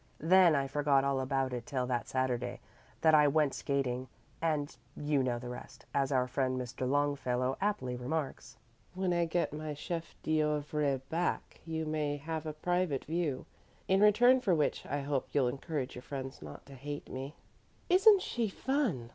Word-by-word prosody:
Then 175 Hz, 0 st, +5 dB
I 140 Hz, -1 st, +1 dB
forgot 140 Hz, -1 st, +2 dB
all 140 Hz, -1 st, +1 dB
about 130 Hz, 0 st, 0 dB
it 125 Hz, -, -5 dB
till 130 Hz, -3 st, -1 dB
that 125 Hz, -1 st, -2 dB
Saturday 125 Hz, -1 st, -1 dB, 0.4 s
that 160 Hz, -1 st, +5 dB
I 150 Hz, -1 st, +7 dB
went 145 Hz, -1 st, +2 dB
skating, 130 Hz, -2 st, -1 dB, 0.3 s
and 155 Hz, -3 st, 0 dB, 0.2 s
'you 145 Hz, -2 st, +1 dB
know 125 Hz, -2 st, 0 dB
the 125 Hz, +1 st, -7 dB
rest,' 125 Hz, 0 st, -9 dB
as 140 Hz, 0 st, +1 dB
our 130 Hz, -2 st, +2 dB
friend 130 Hz, 0 st, 0 dB
Mr. 125 Hz, +1 st, -3 dB
Longfellow 135 Hz, -3 st, +1 dB
aptly 130 Hz, -12 st, -1 dB
remarks. 125 Hz, -2 st, -4 dB, 0.4 s
When 185 Hz, -1 st, 0 dB
I 170 Hz, 0 st, +2 dB
get 165 Hz, -2 st, -1 dB
my 155 Hz, 0 st, -4 dB
chef 165 Hz, +3 st, -5 dB
d'oeuvre 150 Hz, -3 st, 0 dB
back 170 Hz, +2 st, -2 dB
you 160 Hz, 0 st, -2 dB
may 150 Hz, -1 st, -1 dB
have 160 Hz, +2 st, -4 dB
a 155 Hz, -, -3 dB
private 175 Hz, -2 st, -1 dB
view, 160 Hz, -4 st, -2 dB, 0.4 s
in 190 Hz, +1 st, +3 dB
return 245 Hz, +5 st, +6 dB
for 190 Hz, -8 st, +3 dB
which 150 Hz, -2 st, 0 dB
I 145 Hz, 0 st, -2 dB
hope 140 Hz, -1 st, -2 dB
you'll 140 Hz, -3 st, +3 dB
encourage 135 Hz, +1 st, -3 dB
your 125 Hz, -, -8 dB
friends 135 Hz, 0 st, -6 dB
not 75 Hz, -1 st, -10 dB
to 140 Hz, -, -13 dB
hate 145 Hz, +2 st, -6 dB
me." 135 Hz, +4 st, -6 dB, 0.5 s
"Isn't 390 Hz, +2 st, +6 dB
she 230 Hz, -3 st, -1 dB
fun?" 205 Hz, -, -1 dB
145 Hz, 170 wpm, -32 LUFS, 130-160 Hz, 0.5 s, I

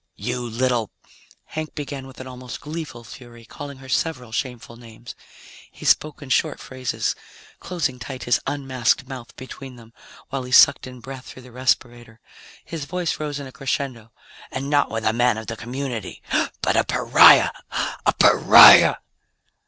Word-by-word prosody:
"You 125 Hz, 0 st, -4 dB
little 120 Hz, -1 st, -1 dB, 0.3 s
" -, -, -29 dB
Hank 155 Hz, 0 st, -5 dB
began 140 Hz, -2 st, -6 dB
with 130 Hz, -, -14 dB
an 130 Hz, -, -8 dB
almost 125 Hz, -1 st, -9 dB
gleeful 150 Hz, -6 st, -7 dB
fury, 120 Hz, 0 st, -13 dB
calling 140 Hz, +3 st, -9 dB
her 135 Hz, 0 st, -13 dB
several 130 Hz, -4 st, -2 dB
shameful 120 Hz, -1 st, -5 dB
names. 115 Hz, 0 st, -12 dB, 0.6 s
He -, -, -12 dB
spoke 155 Hz, -1 st, +1 dB
in 135 Hz, -, -11 dB
short 150 Hz, +3 st, 0 dB
phrases, 130 Hz, -2 st, -3 dB, 0.5 s
closing 150 Hz, -8 st, -3 dB
tight 125 Hz, +2 st, -7 dB
his 120 Hz, -, +2 dB
unmasked 135 Hz, -2 st, -1 dB
mouth 130 Hz, -3 st, -10 dB
between 130 Hz, 0 st, -10 dB
them 115 Hz, -1 st, -16 dB, 0.4 s
while 135 Hz, 0 st, -3 dB
he 125 Hz, 0 st, -9 dB
sucked 125 Hz, -, +6 dB
in 125 Hz, -1 st, -11 dB
breath 130 Hz, 0 st, -9 dB
through 130 Hz, -, -12 dB
the 125 Hz, -, -15 dB
respirator. 120 Hz, -2 st, -2 dB, 0.5 s
His 160 Hz, -4 st, -6 dB
voice 175 Hz, +1 st, -3 dB
rose 145 Hz, -2 st, -4 dB
in 140 Hz, -, -7 dB
a 130 Hz, -, -10 dB
crescendo. 130 Hz, -4 st, -4 dB, 0.4 s
"And 135 Hz, +2 st, -5 dB
not 145 Hz, -1 st, +2 dB
with 115 Hz, 0 st, -4 dB
a 110 Hz, -, +2 dB
man 120 Hz, -1 st, +2 dB
of 110 Hz, -, -7 dB
the 115 Hz, -, -5 dB
community, 120 Hz, -2 st, -6 dB, 0.4 s
but -, -, +1 dB
a -, -, +3 dB
pariah! -, -, +6 dB, 0.5 s
_A -, -, +1 dB
pariah! -, -, +8 dB
130 Hz, 165 wpm, -22 LUFS, 120-140 Hz, 0.6 s, pariah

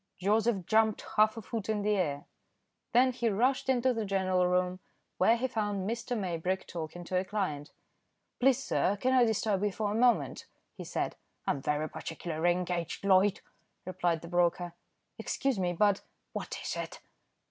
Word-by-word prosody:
Joseph 205 Hz, 0 st, +1 dB
jumped 220 Hz, +1 st, +2 dB
half 215 Hz, +1 st, +4 dB
a 225 Hz, -, -6 dB
foot 220 Hz, 0 st, -5 dB
in 210 Hz, -2 st, 0 dB
the 210 Hz, -, +2 dB
air. 150 Hz, -5 st, -1 dB, 0.7 s
Then 255 Hz, +2 st, +5 dB
he 240 Hz, -2 st, 0 dB
rushed 250 Hz, +7 st, +1 dB
into 255 Hz, 0 st, +3 dB
the 225 Hz, -2 st, -2 dB
general 185 Hz, -2 st, +1 dB
room, 180 Hz, 0 st, +1 dB, 0.4 s
where 225 Hz, +6 st, +5 dB
he 255 Hz, +2 st, 0 dB
found 205 Hz, -5 st, -2 dB
Mr. 235 Hz, +2 st, -2 dB
Maybrick 185 Hz, -1 st, -2 dB
talking 170 Hz, +1 st, -6 dB
to 180 Hz, +1 st, 0 dB
a -, -, -1 dB
client. 185 Hz, -8 st, -3 dB, 0.7 s
"Please 265 Hz, 0 st, +5 dB
sir, 200 Hz, -, +1 dB
can 255 Hz, +3 st, +2 dB
I 250 Hz, -2 st, +6 dB
disturb 215 Hz, -3 st, 0 dB
you 210 Hz, -, +1 dB
for 205 Hz, +2 st, -2 dB
a -, -, -2 dB
moment?" 225 Hz, -, +2 dB, 0.3 s
he -, -, -8 dB
said. -, -, -3 dB, 0.3 s
"I'm 140 Hz, -, 0 dB
very 150 Hz, +2 st, 0 dB
particularly 165 Hz, +1 st, -2 dB
engaged, 175 Hz, +1 st, -2 dB
Loyd," 195 Hz, 0 st, +4 dB, 0.4 s
replied 175 Hz, -3 st, 0 dB
the -, -, -7 dB
broker. 175 Hz, 0 st, +1 dB, 0.5 s
"Excuse 270 Hz, -6 st, -1 dB
me, 180 Hz, -1 st, +1 dB
but 200 Hz, +3 st, +2 dB, 0.2 s
" -, -, -48 dB
"What -, -, -4 dB
is -, -, -3 dB
it?" -, -, -5 dB
195 Hz, 170 wpm, -30 LUFS, 175-225 Hz, 0.7 s, I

